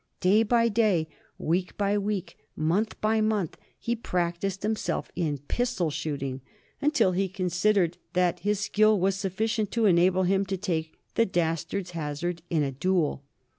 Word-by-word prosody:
Day 195 +4 +4
by 230 +1 +3
day, 205 -8 +2 0.3
week 180 +3 -1
by 200 0 +1
week, 205 -2 -2 0.2
month 180 +8 0
by 220 +1 +2
month 215 -6 0 0.2
he 235 - -2
practised 180 -2 -2
himself 215 0 -2
in 155 -5 -1
pistol 240 -10 0
shooting, 140 -3 -3 0.4
until 295 -10 +3
he 190 +1 0
considered 180 -1 +1
that 180 -1 +2
his 205 +2 0
skill 215 0 +3
was 190 +1 +2
sufficient 210 +2 -1
to 230 -1 +2
enable 185 0 +4
him 195 +2 +2
to 195 0 -2
take 165 -4 -3 0.2
the 230 - +3
dastard's 175 +1 -1
hazard 165 +1 -3
in 160 -3 +2
a 140 - -1
duel. 155 0 0
185 Hz, 150 wpm, -27 LUFS, 170-210 Hz, 0.4 s, Day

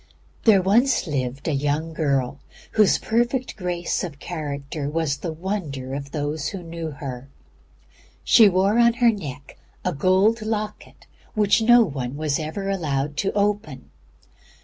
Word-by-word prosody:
There 220 -3 +7
lived 185 - -1
once 230 +2 +3 0.4
a 160 - 0
young 150 +3 -1
girl 140 -4 0 0.3
whose 210 -3 +4
perfect 240 +3 -1
grace 180 -3 -2
of 160 -6 -6
character 145 -2 -5
was 155 -2 -1
the 165 - -4
wonder 155 -7 -4
of 140 0 -5
those 145 0 -3
who 195 -3 -5
knew 165 -1 -5
her. 135 -3 -7 0.9
She 220 -4 +7
wore 195 +5 +2
on 235 0 +5
her 240 0 +4
neck 145 - -8 0.3
a 180 - 0
gold 190 +9 +3
locket 215 -1 -5 0.3
which 210 +1 +3
no 240 +1 +6
one 135 - -4
was 155 -1 -1
ever 160 +6 -4
allowed 150 -7 -1
to 195 - 0
open. 200 -10 -1
165 Hz, 145 wpm, -23 LUFS, 145-210 Hz, 0.9 s, There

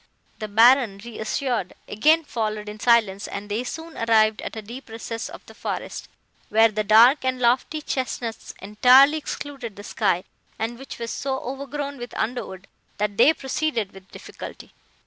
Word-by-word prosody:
"The 215 - -4
Baron, 225 0 +5
reassured, 235 -2 -3
again 310 +10 +3
followed 215 -5 -3
in 210 +1 -8
silence, 215 -4 +2
and 205 +1 -7
they 220 +4 -1
soon 320 +5 -7
arrived 220 -1 +3
at - - -6
a 220 - -5
deep 240 +4 -10
recess 225 0 -5
of - - -12
the - - -14
forest, - - -5 0.4
where 225 +2 +5
the 215 0 -2
dark 230 +7 +6
and 260 -1 -1
lofty 250 +5 +1
chesnuts 245 -4 -4
entirely 255 +9 +6
excluded 275 -7 -6
the 205 - -10
sky, 190 -4 0 0.3
and 235 +2 -3
which 270 - -9
was 230 -1 -5
so 265 0 -2
overgrown 280 +1 -5
with 240 -1 -8
underwood, 215 -5 -4 0.3
that 205 -1 -2
they 280 - +7
proceeded 265 -7 -2
with 190 0 -15
difficulty. - - -10
230 Hz, 160 wpm, -24 LUFS, 215-265 Hz, 0.4 s, they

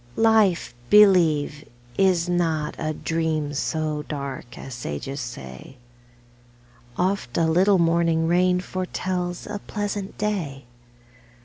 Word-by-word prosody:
LIFE. - - 0
Life, 210 - +3
believe, 165 -8 +5 0.3
is 185 -3 +2
not 165 -4 0
a 155 -1 -1
dream 155 -2 -2
So 155 +1 -2
dark 140 -4 -6
as 135 - -8
sages 120 - -5
say; 95 - -9 1.2
Oft 185 -9 -1
a 165 - +3
little 185 +5 +4
morning 165 -1 +2
rain 180 +1 +3
Foretells 180 -1 -3
a 210 -1 -5
pleasant 205 -2 -4
day. 170 -11 -3
165 Hz, 110 wpm, -24 LUFS, 145-185 Hz, 1.2 s, believe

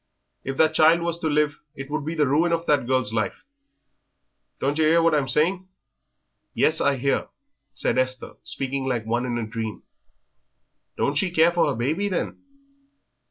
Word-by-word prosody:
If 135 0 -4
that 160 0 +4
child 160 +2 +5
was 170 0 -1
to 160 - -2
live 150 -1 +1 0.2
it 135 0 -8
would 155 0 -2
be 160 +2 -3
the 150 -2 +2
ruin 155 +6 +2
of 170 0 0
that 145 -5 +2
girl's 130 -4 0
life. 110 -2 -2 1.2
Don't 145 +3 -1
yer 155 - +4
'ear 165 +2 +5
what 165 -1 +3
I'm 145 -3 +1
saying?" 180 +8 +1 0.9
"Yes, 160 +1 +2
I 140 0 +2
hear," 135 +2 0 0.5
said - - +1
Esther, 130 0 -2
speaking 135 0 -4
like 120 -4 -1
one 120 +3 -1
in 120 -1 -2
a 115 - -2
dream; 110 -2 -5 1.1
"don't 140 - +1
she 190 - 0
care 170 0 +4
for 175 -2 +2
her 145 - -1
baby, 155 - -1
then?" 185 - -3
145 Hz, 175 wpm, -24 LUFS, 130-165 Hz, 1.2 s, child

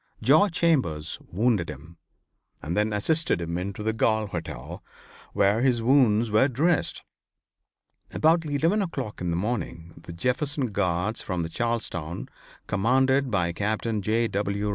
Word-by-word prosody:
George 160 +8 +5
Chambers 130 - 0
wounded 105 -3 +1
him, 75 +3 -10 0.6
and 85 +3 -4
then 105 +1 +1
assisted 155 - +1
him 85 0 -4
into 100 +3 -5
the 110 +1 0
Galt 110 -2 +1
hotel, 85 -2 -6 0.5
where 100 +3 +3
his 125 -3 +2
wounds 115 -4 +3
were 110 +5 +4
dressed. 150 +6 0 1.1
About 165 +2 +3
eleven 160 +7 +1
o'clock 135 - -4
in 90 - -1
the 85 - 0
morning 90 -5 -3
the 85 +1 -11
Jefferson 125 - -1
Guards 95 +2 -1
from 90 -3 -3
Charlestown 90 -5 -3 0.4
commanded 130 +6 +2
by 90 -5 0
Captain 110 +3 -1
J. 115 +4 +1
W. 100 0 -2
110 Hz, 135 wpm, -26 LUFS, 90-130 Hz, 1.1 s, George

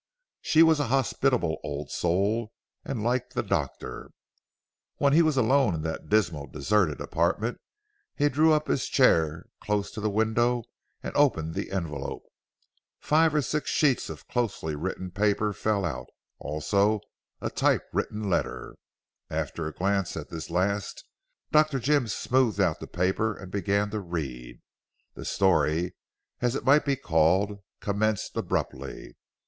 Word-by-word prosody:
She 160 +1 +5
was 160 -2 +4
a 145 - 0
hospitable 125 -7 +1
old 75 -1 -5
soul, 100 +6 0 0.3
and 115 -5 -4
liked 125 +2 -1
the - - 0
doctor. - - -3 0.9
When 140 -1 +3
he 165 - +6
was 155 -4 +2
alone 130 -4 +3
in 80 - -4
that 80 0 -5
dismal, 85 -9 +1
deserted, 80 0 +1
apartment, 105 +8 -1 0.5
he 145 - +3
drew 155 +3 +4
up 155 0 +2
his 135 - 0
chair 80 - +3
close 105 -1 -1
to 110 - -6
the 110 - +1
window 115 +3 +1 0.4
and - - -5
opened 80 - +2
the - - -4
envelope. 80 -8 -4 0.8
Five 155 0 +3
or 150 - +3
six 150 +2 -2
sheets 140 -6 +2
of - - -9
closely 100 -10 -2
written 90 +3 -4
paper 105 +2 +1
fell 100 -1 0
out; 80 - -4 0.3
also 100 +8 +1 0.4
a - - -3
typewritten 105 0 0
letter. 90 - -2 0.5
After 80 -2 -3
a - - -4
glance 100 +1 -1
at 75 - -6
this 80 -2 -6
last, 95 +4 -1 0.5
Dr. 155 -2 +4
Jim 135 0 +2
smoothed 120 0 +1
out 90 -4 +2
the - - -7
paper 95 +4 0
and 95 -1 -10
began 100 +1 0
to 110 - -2
read. 65 -10 -6 0.5
The - - -9
story 90 -3 +2 0.5
as 120 +1 +1
it - - -4
might 140 +2 +5
be 140 -1 +2
called 95 -1 +2 0.2
commenced 105 0 -1
abruptly. 70 +1 -3
105 Hz, 145 wpm, -27 LUFS, 85-125 Hz, 0.9 s, he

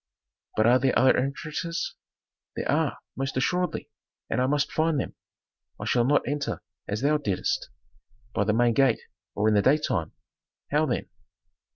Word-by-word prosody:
"But 110 - +4
are 125 +2 +6
there 130 0 +2
other 130 +1 +5
entrances?" 150 +5 -2 0.6
"There - - -3
are, - - +1 0.2
most 135 -1 -3
assuredly, 180 +7 0 0.4
and - - +1
I 130 - +2
must 145 +1 +1
find 160 -2 +1
them. - - -3 0.7
I - - -5
shall 120 -1 +2
not 145 0 +2
enter 145 +1 -2 0.2
as 105 +2 -2
thou 150 +2 +3
didst, 100 -10 -1 0.6
by 100 - +1
the 105 - +2
main 120 +1 +3
gate 135 -2 +3 0.3
or 105 +2 +2
in 110 - +4
the 105 - +5
daytime." 130 - +1 0.6
"How 150 +2 +3
then?" 125 - -1
135 Hz, 160 wpm, -27 LUFS, 120-150 Hz, 0.7 s, are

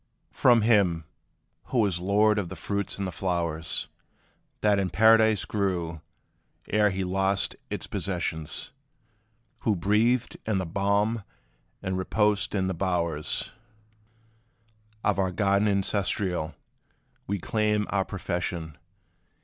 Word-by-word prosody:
From 120 -3 +5
him, 100 -8 +3 0.6
who 130 - -3
was 95 -5 +1
lord 105 +3 +3
of 90 -4 -3
the 95 - -7
fruits 100 +1 -3
and 100 - -2
the 90 - -3
flowers, 85 -2 -1 0.7
That 105 -2 +3
in 95 -2 0
Paradise 110 +1 +5
grew, 90 -6 -2 0.7
ere 105 0 +3
he 95 0 -2
lost 95 +1 0
its - - -4
possession 85 -5 -3 1.1
Who 110 - +1
breathed 110 +7 +1
in 110 -3 +1
the 95 - -1
balm, 100 +5 0 0.6
and 95 0 -1
reposed 105 +2 +1
in 95 -2 +1
the 95 - -1
bowers 85 -4 -1 1.5
Of 100 -2 +1
our 95 -1 +2
garden 100 +2 +2
ancestral, 95 -5 0 0.7
we 100 - -1
claim 105 +2 0
our 100 -1 +2
profession. 85 -5 -4
100 Hz, 115 wpm, -27 LUFS, 90-105 Hz, 1.5 s, From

